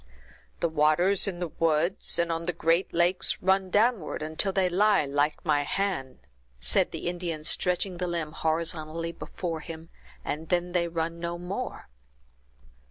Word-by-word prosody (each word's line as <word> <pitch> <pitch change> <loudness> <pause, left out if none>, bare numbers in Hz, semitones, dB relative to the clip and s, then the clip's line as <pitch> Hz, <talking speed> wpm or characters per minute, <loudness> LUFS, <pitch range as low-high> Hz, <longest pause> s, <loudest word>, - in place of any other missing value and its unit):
"The 170 - +3
waters 160 +6 +3
in 185 -3 -2
the 175 -2 -2
woods, 165 +4 +1
and 170 0 +1
on 165 0 -2
the 180 - -1
great 165 +2 +1
lakes, 175 +2 +2
run 190 0 +2
downward 210 -6 +1
until 160 +6 0
they 190 -1 +2
lie 200 -1 +3
like 145 +3 0
my 150 -2 +3
hand," 160 -5 -2 0.4
said - - +3
the - - -5
Indian, 175 -3 -3
stretching 180 +2 +1
the 180 0 -2
limb 165 -3 -2
horizontally 160 +1 -2
before 170 0 -5
him, 165 0 -9 0.4
"and 155 +2 -4
then 180 0 +1
they 175 -1 +1
run 165 0 -3
no 170 0 -3
more." 185 - -5
170 Hz, 155 wpm, -28 LUFS, 160-180 Hz, 0.4 s, The